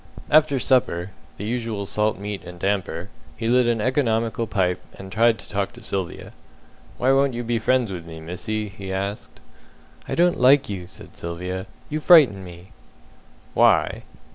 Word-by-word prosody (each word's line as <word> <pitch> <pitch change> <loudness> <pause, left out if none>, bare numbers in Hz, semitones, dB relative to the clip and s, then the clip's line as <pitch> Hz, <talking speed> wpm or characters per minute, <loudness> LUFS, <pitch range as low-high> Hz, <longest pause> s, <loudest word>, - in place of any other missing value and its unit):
After 150 -2 +5
supper 100 -9 +1 0.3
the - - -6
usual 115 -3 -3
salt 105 +2 0
meat 100 0 -5
and 90 0 -10
damper 95 -2 -2 0.3
he 115 - -2
lit 125 +1 +4
an 120 -1 +1
economical 115 -2 0
pipe, 90 -4 0 0.2
and 95 0 -10
tried 115 +1 +3
to - - -12
talk 100 -1 -2
to 120 - -14
Sylvia. 95 -5 -4 0.6
"Why 130 +2 +3
won't 135 -1 +3
you 120 - -3
be 115 0 0
friends 125 -1 +1
with 90 -2 -5
me, 80 -1 -9
missy?" 105 +6 -4
he 95 0 -8
asked. 100 +2 -4 0.7
"I - - -2
don't 175 +1 +3
like 135 +2 +5
you," 95 -3 -5
said 95 - -13
Sylvia. 90 +3 -5 0.2
"You 155 - -3
frighten 145 - +6
me." 90 0 -12 0.8
"Why?" - - +3
105 Hz, 165 wpm, -23 LUFS, 95-120 Hz, 0.8 s, frighten